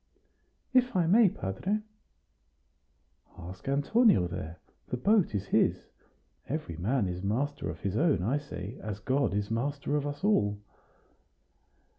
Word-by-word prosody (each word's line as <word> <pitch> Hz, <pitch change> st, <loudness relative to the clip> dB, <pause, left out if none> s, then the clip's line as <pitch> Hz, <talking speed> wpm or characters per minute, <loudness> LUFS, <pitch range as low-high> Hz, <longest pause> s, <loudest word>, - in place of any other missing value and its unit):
"If 250 Hz, -2 st, +3 dB
I 175 Hz, -2 st, +3 dB
may, 205 Hz, +4 st, +6 dB
padre." 180 Hz, -, -2 dB, 1.6 s
"Ask 90 Hz, +4 st, -10 dB
Antonio 145 Hz, -, +4 dB
there; 85 Hz, -2 st, -6 dB, 0.3 s
the 125 Hz, -, -3 dB
boat 200 Hz, -, +2 dB
is 100 Hz, 0 st, -2 dB
his. -, -, +1 dB, 0.6 s
Every 150 Hz, -, -3 dB
man 105 Hz, +5 st, 0 dB
is 90 Hz, 0 st, -4 dB
master 125 Hz, -, -1 dB
of 80 Hz, +1 st, -7 dB
his 100 Hz, 0 st, -2 dB
own, 150 Hz, -, +2 dB
I 130 Hz, +9 st, +1 dB
say, 120 Hz, -5 st, -8 dB
as 105 Hz, -2 st, -4 dB
God 135 Hz, +6 st, +1 dB
is 105 Hz, +1 st, -2 dB
master 140 Hz, +5 st, -1 dB
of 145 Hz, -1 st, 0 dB
us 145 Hz, +2 st, -6 dB
all." 105 Hz, -, +2 dB
130 Hz, 135 wpm, -29 LUFS, 95-155 Hz, 1.6 s, may